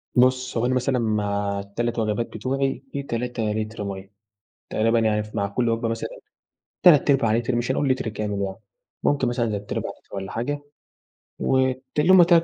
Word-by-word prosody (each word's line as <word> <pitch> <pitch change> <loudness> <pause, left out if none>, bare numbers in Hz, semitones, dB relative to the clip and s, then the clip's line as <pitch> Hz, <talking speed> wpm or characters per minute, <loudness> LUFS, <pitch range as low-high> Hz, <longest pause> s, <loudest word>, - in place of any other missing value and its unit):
بُص، 130 0 +3
هو 115 - +1
أنا 130 +1 +1
مثلًا 130 0 +1
مع 100 -2 0
ال3 115 +4 -2
وجبات 110 +1 0
بتوعي، 135 +4 -1
في 140 0 -3
3 120 -2 -3
لِتْر 110 0 -3
مَيَّة، 95 -1 -6 0.6
تقريبًا 115 +1 +2
يعني 105 -1 +2
ف 105 +1 -12
مع 100 -1 +1
كل 115 +3 0
وجبة 115 0 0
مثلًا 115 0 -3 0.7
تلات 150 -5 +7
أرباع 130 -6 +4
لِتْر 120 +1 0
مش 120 +2 0
هنقول 140 +1 +1
لِتْر 130 -3 0
كامل 105 -1 -3
يعني، 95 -1 -2 0.5
ممكن 140 -3 +2
مثلًا 120 -1 0
تلات 105 -2 -4
أرباع - - -2
لِتْر - - -12
والّا 95 -1 -5
حاجة 145 +5 -2 0.8
وت 130 0 +1 0.2
اللي 150 - +3
يوم 190 - +9
هم 175 - +9
3 170 -1 +5
115 Hz, 190 wpm, -24 LUFS, 105-130 Hz, 0.8 s, يوم